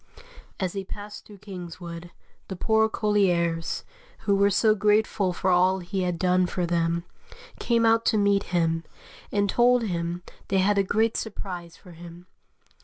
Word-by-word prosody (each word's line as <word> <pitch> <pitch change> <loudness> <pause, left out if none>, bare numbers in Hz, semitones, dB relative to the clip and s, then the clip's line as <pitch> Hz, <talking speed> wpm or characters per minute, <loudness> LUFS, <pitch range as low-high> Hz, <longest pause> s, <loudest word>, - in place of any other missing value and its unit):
As 185 -3 -2
he 195 -1 -4
passed 205 +2 -9
through 205 - -13
Kingswood, 175 -2 -8 0.4
the 190 - -5
poor 220 +3 +2
colliers, 175 -7 0 0.4
who 205 -2 +2
were 200 +1 +4
so 215 +2 +3
grateful 210 -2 +2
for 185 +1 0
all 185 +1 +4
he 190 +1 -3
had 180 -2 -1
done 180 0 +2
for 180 0 -2
them, 170 0 0 0.6
came 230 -1 +2
out 225 0 +4
to 220 - +3
meet 200 -1 +2
him, 165 -2 0 0.5
and 205 0 +1
told 245 +3 +3
him 175 -3 -3 0.2
they 195 - +1
had 200 +2 +3
a - - +3
great 220 +4 +1
surprise 180 -5 -6
for 180 - -15
him. 170 +1 -12
190 Hz, 160 wpm, -26 LUFS, 175-210 Hz, 0.6 s, were